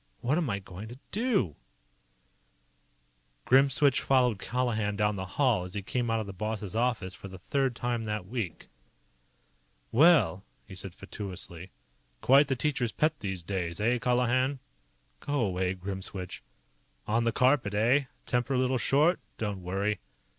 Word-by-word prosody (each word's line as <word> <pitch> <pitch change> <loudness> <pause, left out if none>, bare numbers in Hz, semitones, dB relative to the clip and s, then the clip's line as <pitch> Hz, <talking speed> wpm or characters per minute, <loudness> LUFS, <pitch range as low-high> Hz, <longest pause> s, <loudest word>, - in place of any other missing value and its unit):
"What 145 +7 +1
am 160 -7 -1
I 100 - 0
going 95 +2 -9
to 120 +3 -10
do?" 205 - +1 1.9
Grimswitch 135 +1 +5
followed 125 -6 +3
Colihan 110 -3 -1
down 105 0 +2
the 95 -1 -4
hall 125 -10 +3
as 90 +1 -8
he 100 - -3
came 120 +4 -1
out 115 0 +1
of 110 - -3
the 100 - -7
boss's 105 +1 -4
office 115 -6 0
for 100 - -9
the 95 -1 -9
third 135 +6 0
time 120 -1 -2
that 105 -3 -3
week. 110 -5 -4 1.2
"Well!" 135 - +5 0.2
he 100 - -11
said 95 -1 -3
fatuously. 95 -3 -7 0.5
"Quite 135 - +5
the 135 - 0
teacher's 130 -4 0
pet, 155 -1 +1
these 95 -4 -4
days. 85 -2 -3
Eh, 120 +3 +2
Colihan?" 125 +3 +2 0.6
"Go 145 - -1
away, 95 -3 0
Grimswitch." 95 0 -5 0.6
"On 115 +2 +1
the 115 - +2
carpet, 125 -4 +2
eh? 125 +7 +3 0.2
Temper 125 +2 0
a - - +2
little 130 0 +1
short? 150 +9 +3 0.2
Don't 105 -3 -3
worry." 100 +4 -1
110 Hz, 150 wpm, -29 LUFS, 95-130 Hz, 1.9 s, Grimswitch